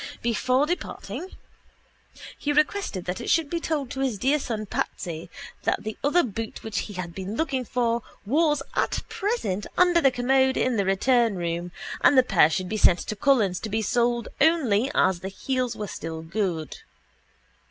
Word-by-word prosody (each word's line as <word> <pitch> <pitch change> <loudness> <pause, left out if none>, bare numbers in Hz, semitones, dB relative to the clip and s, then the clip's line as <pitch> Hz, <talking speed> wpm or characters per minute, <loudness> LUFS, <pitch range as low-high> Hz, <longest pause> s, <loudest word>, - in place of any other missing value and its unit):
Before 255 +4 +2
departing 355 +2 -4 1.1
he 290 - -2
requested 300 - 0
that 180 +6 -3
it - - -4
should 325 -4 +2
be 340 - 0
told 295 -6 -2
to 265 - -5
his 260 -6 0
dear 275 +8 +2
son 220 -5 -3
Patsy 170 -4 -4 0.3
that - - 0
the 215 0 -4
other 315 +5 +4
boot 225 -1 -5
which 220 -2 -2
he 205 - -5
had 180 -2 -5
been 195 +3 -5
looking 270 -3 -1
for 235 -1 0 0.2
was 295 +4 +2
at - - 0
present 390 - -2
under 355 -1 +5
the 270 - +6
commode 265 +1 +2
in 255 -1 +1
the 200 -3 +1
return 230 +3 +3
room 175 0 -3 0.3
and 285 - +6
that 255 -1 +5
the - - -4
pair 160 -4 +6
should 185 +2 -2
be 215 - -2
sent 180 -4 +5
to 215 - -4
Cullen's 205 -6 +2
to 220 - -5
be 220 +1 -1
soled 240 +1 +1
only 270 -7 +3
as 185 -2 +3
the 190 +2 -5
heels 255 +5 -2
were 210 - -4
still 160 0 -6
good. 170 -3 -2
235 Hz, 180 wpm, -25 LUFS, 195-275 Hz, 1.1 s, the